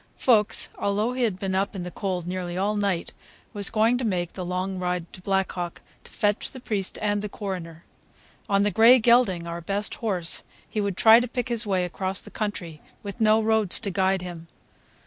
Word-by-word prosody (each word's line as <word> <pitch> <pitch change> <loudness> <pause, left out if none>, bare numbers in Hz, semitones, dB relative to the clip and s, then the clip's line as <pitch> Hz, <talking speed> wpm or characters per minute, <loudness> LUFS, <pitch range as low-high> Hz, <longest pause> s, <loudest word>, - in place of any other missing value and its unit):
Fuchs, 215 -5 +3
although 210 +4 0
he 255 - -3
had 215 -6 +1
been 190 0 -3
up 195 +2 -1
in 185 - -4
the 180 - -6
cold 185 -3 -3
nearly 180 -1 -4
all 205 +3 0
night, 200 -4 -1 0.4
was 205 -1 +1
going 230 +3 +2
to - - -3
make 180 -6 -1
the 185 - -5
long 185 +1 -3
ride 180 -1 -2
to 185 - -11
Black 190 0 0
Hawk 175 -1 -5 0.2
to - - -14
fetch 205 -2 0
the 260 - -10
priest 210 -6 -2
and 205 -1 +1
the 210 - -4
coroner. 175 -6 -6 0.6
On 200 0 +3
the 205 - +1
gray 230 +4 +7
gelding, 235 -7 +3
our 170 0 -5
best 200 +4 -2
horse, 185 -7 0 0.2
he 215 - -2
would 200 -2 -2
try 225 +1 +8
to 245 - -2
pick 245 0 -3
his 235 -2 -1
way 185 -2 +1
across 190 +2 -3
the - - -8
country 175 -7 -4 0.2
with 200 +3 -7
no 215 0 +5
roads 220 -3 +3
to 200 -3 -2
guide 190 0 +1
him. 170 -2 -8
195 Hz, 205 wpm, -25 LUFS, 180-215 Hz, 0.6 s, try